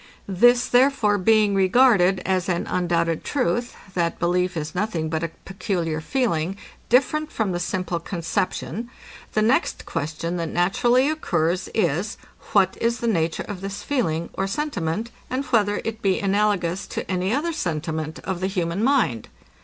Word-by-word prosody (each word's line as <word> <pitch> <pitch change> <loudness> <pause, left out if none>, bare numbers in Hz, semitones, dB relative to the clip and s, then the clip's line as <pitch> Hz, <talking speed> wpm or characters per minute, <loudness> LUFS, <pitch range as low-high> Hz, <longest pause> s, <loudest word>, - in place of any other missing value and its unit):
This, 240 +6 +4
therefore, 245 -5 +3
being 215 +1 +4
regarded 195 -1 +4
as 185 0 0
an 175 -1 0
undoubted 170 -2 0
truth, 240 -3 -1 0.2
that 170 -2 0
belief 180 +1 0
is 155 +1 -4
nothing 180 -5 -1
but 160 0 -1
a 165 - 0 0.2
peculiar 175 -5 -2
feeling, 190 - -1 0.3
different 300 +5 +2
from 215 -4 -1
the 175 - -2
simple 180 -1 -2
conception, 185 +6 -3 0.4
the 215 - +2
next 235 +5 +1
question, 165 +2 -3
that 165 -2 -2
naturally 240 - +2
occurs, 180 - 0
is, 180 0 0 0.4
what 190 -2 +3
is 235 +1 +1
the 235 - -3
nature 165 -6 0
of 200 -3 -6
this 195 0 -5
feeling, 170 - -1
or 195 - -1
sentiment, 215 - -2 0.2
and 260 +2 -2
whether 205 -4 +2
it 225 0 -4
be 195 -2 +2
analogous 200 -2 0
to - - -4
any 185 +1 -1
other 310 +7 0
sentiment 160 - -3
of 190 -2 -3
the 185 - 0
human 185 0 -1
mind? 235 - +2
190 Hz, 155 wpm, -23 LUFS, 170-225 Hz, 0.4 s, This